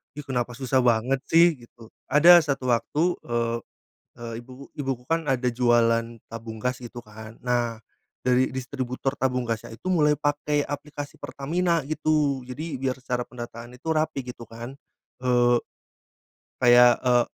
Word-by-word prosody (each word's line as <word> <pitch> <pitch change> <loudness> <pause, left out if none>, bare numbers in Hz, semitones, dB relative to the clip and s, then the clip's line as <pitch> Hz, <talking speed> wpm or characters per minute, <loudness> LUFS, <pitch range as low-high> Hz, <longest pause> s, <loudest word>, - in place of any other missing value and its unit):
"Ih, 150 - -6
kenapa 125 -3 -2
susah 130 0 +1
banget 125 +2 +2
sih?" 165 -3 +5
gitu. 120 -1 -16 0.2
Ada 170 +5 +8
satu 135 -5 -1
waktu, 145 +7 +1 0.2
eee, 115 0 -1 0.6
eee, 115 -1 -6
ibuku 130 +2 -12
ibuku 135 -4 -3
kan 165 0 +1
ada 130 -3 +1
jualan 115 -1 +2
tabung 115 -1 -8
gas, 125 0 -2
gitu 120 +1 -8
kan, 110 0 -12
nah, 120 -2 -1 0.4
dari 125 +1 +2
distributor 130 +1 -3
tabung 125 -2 -1
gasnya 115 0 -3
itu, 115 +11 -7
mulai 155 -5 +4
pakai 145 0 0
aplikasi 145 0 -6
Pertamina, 165 +5 -1
gitu. 150 -4 +1
Jadi, 145 +4 -5
biar 130 0 -1
secara 125 -1 -2
pendataan 120 -1 -9
itu 125 +6 -10
rapi, 155 -2 0
gitu 120 -1 -8
kan, 115 +4 -9 0.5
eee, 120 -1 +4 1.1
kayak, 120 0 +7
eee, 120 -1 +4
125 Hz, 145 wpm, -25 LUFS, 120-145 Hz, 1.1 s, Ada